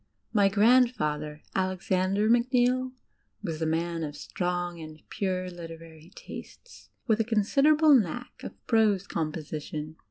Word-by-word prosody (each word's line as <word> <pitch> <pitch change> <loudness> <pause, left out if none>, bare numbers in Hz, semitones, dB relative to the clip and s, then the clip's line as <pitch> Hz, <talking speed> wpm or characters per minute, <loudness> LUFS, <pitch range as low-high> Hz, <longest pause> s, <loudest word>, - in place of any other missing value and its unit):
My 200 -3 +4
grandfather, 195 -10 +2
Alexander 185 +2 0
Macneill, 250 +2 +2 0.5
was 165 -2 -4
a 160 - +1
man 165 +1 -1
of 145 -1 -5
strong 175 +2 -3
and 155 -1 -10
pure 185 -2 -2
literary 165 -1 -10
tastes, - - -11 0.2
with 220 -3 +2
a - - +3
considerable 275 +8 +4
ktuick 245 +4 -2
of - - -10
prose 215 -4 +3
composition. 155 -1 -5
185 Hz, 120 wpm, -28 LUFS, 160-235 Hz, 0.5 s, My